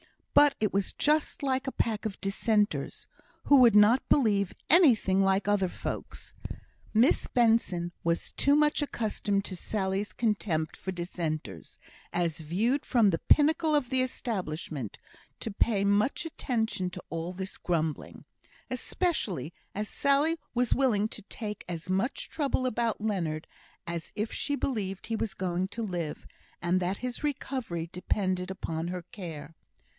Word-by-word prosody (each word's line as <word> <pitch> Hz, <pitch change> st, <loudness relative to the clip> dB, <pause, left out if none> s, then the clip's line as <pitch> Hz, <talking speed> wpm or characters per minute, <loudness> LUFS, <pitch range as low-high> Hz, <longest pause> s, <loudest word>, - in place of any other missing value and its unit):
But 290 Hz, -1 st, +6 dB
it 210 Hz, -2 st, 0 dB
was 200 Hz, 0 st, 0 dB
just 300 Hz, 0 st, +1 dB
like 265 Hz, 0 st, 0 dB
a -, -, 0 dB
pack 220 Hz, -4 st, -1 dB
of 200 Hz, -, -8 dB
Dissenters, 210 Hz, +1 st, 0 dB, 0.4 s
who 285 Hz, -, +6 dB
would 240 Hz, -4 st, +7 dB
not 210 Hz, +5 st, +6 dB
believe 205 Hz, -8 st, +3 dB
anything 235 Hz, -, +5 dB
like 195 Hz, +1 st, +2 dB
other 205 Hz, -2 st, +3 dB
folks. -, -, -6 dB, 0.6 s
Miss 230 Hz, +4 st, +3 dB
Benson 225 Hz, -8 st, +2 dB
was 170 Hz, 0 st, -1 dB
too 280 Hz, +1 st, +3 dB
much 300 Hz, 0 st, +3 dB
accustomed 210 Hz, -6 st, -1 dB
to 185 Hz, -, -5 dB
Sally's 195 Hz, +1 st, -2 dB
contempt 190 Hz, -8 st, 0 dB
for 190 Hz, -, -5 dB
Dissenters, 165 Hz, -, -4 dB, 0.3 s
as 170 Hz, -3 st, -1 dB
viewed 210 Hz, -, 0 dB
from 230 Hz, -5 st, +4 dB
the 165 Hz, -, -1 dB
pinnacle 310 Hz, +1 st, +4 dB
of 275 Hz, -5 st, 0 dB
the 260 Hz, 0 st, +3 dB
Establishment, 170 Hz, -, -3 dB, 0.4 s
to 225 Hz, -, -4 dB
pay 200 Hz, 0 st, +1 dB
much 210 Hz, +12 st, +2 dB
attention 225 Hz, -, -1 dB
to -, -, -8 dB
all 165 Hz, +1 st, -3 dB
this 190 Hz, +1 st, -5 dB
grumbling; 160 Hz, -4 st, -2 dB, 0.5 s
especially 230 Hz, -, -1 dB, 0.2 s
as 210 Hz, +1 st, -2 dB
Sally 290 Hz, +7 st, +2 dB, 0.2 s
was 245 Hz, -1 st, +3 dB
willing 225 Hz, -6 st, +2 dB
to 215 Hz, -, -6 dB
take 210 Hz, 0 st, -6 dB
as 175 Hz, +1 st, -4 dB
much 195 Hz, +8 st, 0 dB
trouble 275 Hz, -4 st, -1 dB
about 235 Hz, -3 st, 0 dB
Leonard 170 Hz, -8 st, -1 dB, 0.4 s
as 170 Hz, -1 st, -5 dB
if 215 Hz, +2 st, -2 dB
she 285 Hz, -, -1 dB
believed 200 Hz, -9 st, -2 dB
he 225 Hz, -, -1 dB
was 220 Hz, -3 st, -3 dB
going 185 Hz, 0 st, -1 dB
to 230 Hz, +3 st, -5 dB
live, 175 Hz, -7 st, -4 dB, 0.3 s
and 175 Hz, +2 st, +1 dB
that 185 Hz, +2 st, -1 dB
his 250 Hz, +2 st, -5 dB
recovery 255 Hz, -, -3 dB
depended 185 Hz, 0 st, -1 dB
upon 165 Hz, -3 st, -3 dB
her 180 Hz, 0 st, -4 dB
care. 165 Hz, -, -7 dB
205 Hz, 145 wpm, -29 LUFS, 180-250 Hz, 0.6 s, would